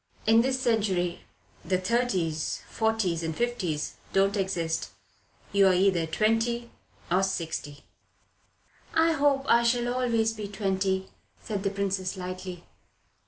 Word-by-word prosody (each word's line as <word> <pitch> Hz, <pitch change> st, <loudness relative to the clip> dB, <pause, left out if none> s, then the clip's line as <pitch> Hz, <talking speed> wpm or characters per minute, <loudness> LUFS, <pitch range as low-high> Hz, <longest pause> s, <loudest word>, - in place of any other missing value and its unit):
"In 225 Hz, +1 st, +6 dB
this 260 Hz, +1 st, 0 dB
century 195 Hz, -8 st, +1 dB, 0.4 s
the 185 Hz, +2 st, +1 dB
thirties, 185 Hz, -7 st, -1 dB
forties, 220 Hz, -7 st, 0 dB
and 160 Hz, -1 st, -3 dB
fifties 190 Hz, -11 st, -2 dB, 0.2 s
don't 195 Hz, +1 st, +3 dB
exist. 180 Hz, -5 st, -1 dB, 0.6 s
You're 195 Hz, -2 st, +5 dB
either 180 Hz, -3 st, +2 dB
twenty 225 Hz, +6 st, 0 dB, 0.4 s
or 185 Hz, +2 st, +4 dB
sixty." 160 Hz, -6 st, -3 dB, 1.1 s
"I 325 Hz, +1 st, +4 dB
hope 280 Hz, -3 st, +2 dB
I 235 Hz, -, +5 dB
shall 240 Hz, +1 st, +1 dB
always 230 Hz, -3 st, +1 dB
be 210 Hz, -2 st, -5 dB
twenty," 190 Hz, -1 st, -1 dB, 0.3 s
said 205 Hz, -3 st, -3 dB
the 195 Hz, -, 0 dB
Princess 195 Hz, -1 st, -2 dB
lightly. 185 Hz, -1 st, -6 dB
195 Hz, 115 wpm, -27 LUFS, 185-235 Hz, 1.1 s, In